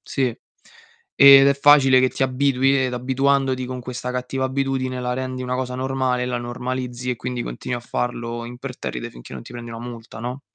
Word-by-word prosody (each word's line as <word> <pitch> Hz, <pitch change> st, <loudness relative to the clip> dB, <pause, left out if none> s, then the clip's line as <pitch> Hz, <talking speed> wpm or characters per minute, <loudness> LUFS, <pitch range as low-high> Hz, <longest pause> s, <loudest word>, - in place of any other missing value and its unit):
Sì, 130 Hz, -4 st, -1 dB, 0.8 s
ed 140 Hz, 0 st, +10 dB
è 140 Hz, -, +3 dB
facile 140 Hz, -2 st, +6 dB
che 130 Hz, -, +3 dB
ti -, -, -3 dB
abitui 135 Hz, 0 st, +2 dB
ed 125 Hz, -, -4 dB
abituandoti 130 Hz, +1 st, +1 dB
con 130 Hz, 0 st, -5 dB
questa 125 Hz, 0 st, -5 dB
cattiva 125 Hz, +1 st, -3 dB
abitudine, 130 Hz, -1 st, -1 dB
la 125 Hz, 0 st, -2 dB
rendi 130 Hz, 0 st, -4 dB
una 125 Hz, 0 st, -2 dB
cosa 125 Hz, -1 st, -3 dB
normale 130 Hz, -1 st, -1 dB
e -, -, -1 dB
la 125 Hz, -1 st, -2 dB
normalizzi, 125 Hz, +1 st, -4 dB
e 125 Hz, -, -2 dB
quindi 125 Hz, +1 st, -4 dB
continui 125 Hz, -, -4 dB
a -, -, -11 dB
farlo 120 Hz, -1 st, -3 dB
imperterrite 125 Hz, +2 st, -6 dB
finché -, -, -13 dB
non 65 Hz, -2 st, -7 dB
ti -, -, -12 dB
prendi 120 Hz, -1 st, -8 dB
una 115 Hz, 0 st, -7 dB
multa, 115 Hz, -2 st, -9 dB
no? 125 Hz, +3 st, -5 dB
125 Hz, 195 wpm, -22 LUFS, 125-130 Hz, 0.8 s, ed